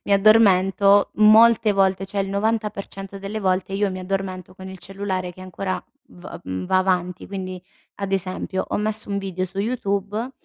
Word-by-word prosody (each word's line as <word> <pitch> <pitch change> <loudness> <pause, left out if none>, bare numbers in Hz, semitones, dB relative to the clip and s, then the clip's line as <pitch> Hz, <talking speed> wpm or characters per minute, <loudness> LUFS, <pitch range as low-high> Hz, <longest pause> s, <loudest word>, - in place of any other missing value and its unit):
mi 200 - 0
addormento 200 -1 +5
molte 220 +1 +6
volte 195 -1 +1
cioè 200 - -5
il 195 - -2
90% 200 -2 -3
delle 200 +2 -4
volte 185 0 0
io 200 +1 +1
mi 185 - -5
addormento 185 -1 -4
con 190 0 -10
il 190 0 -9
cellulare 190 -1 -4
che 185 - -15
ancora 185 +1 -4 0.3
v 180 +1 -11
mhmm, 95 0 -4
va 185 - +3
avanti. 180 -1 -1
Quindi 185 -2 -6 0.3
ad 195 -1 -4
esempio: 190 0 -2
ho - - -1
messo 215 +1 -1
un 200 - -1
video 190 -2 -3
su 190 +1 -8
YouTube, 205 +1 -2
195 Hz, 170 wpm, -22 LUFS, 185-205 Hz, 0.3 s, molte